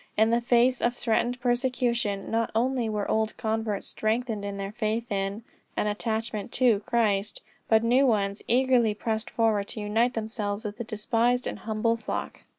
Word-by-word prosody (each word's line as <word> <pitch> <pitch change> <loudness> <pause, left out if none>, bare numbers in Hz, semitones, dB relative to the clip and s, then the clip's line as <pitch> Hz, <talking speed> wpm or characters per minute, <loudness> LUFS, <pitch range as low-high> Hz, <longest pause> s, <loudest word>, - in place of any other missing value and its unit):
In 220 +1 +4
the 235 +1 +3
face 240 +1 +3
of 240 +1 +1
threatened 240 +2 0
persecution 240 -4 0
not 225 0 +1
only 245 0 +1
were 210 -1 -2
old 220 0 0
converts 220 -2 -2
strengthened 220 -1 -1
in 200 0 -4
their 195 0 -4
faith 225 +1 -2
in, 200 +2 -2 0.3
and - - +1
attachment 220 0 -2
to 240 -5 +4
Christ, 210 -3 0 0.3
but 220 0 +5
new 255 +4 +4
ones 200 -3 +1
eagerly 245 -3 +3
pressed 220 +1 -2
forward 215 -3 +1
to - - -6
unite 225 +4 +1
themselves 215 -1 -3
with 210 0 -5
the 235 - -3
despised 230 +3 0
and - - -4
humble 225 +1 0
flock. 225 - -5
225 Hz, 165 wpm, -27 LUFS, 210-240 Hz, 0.3 s, but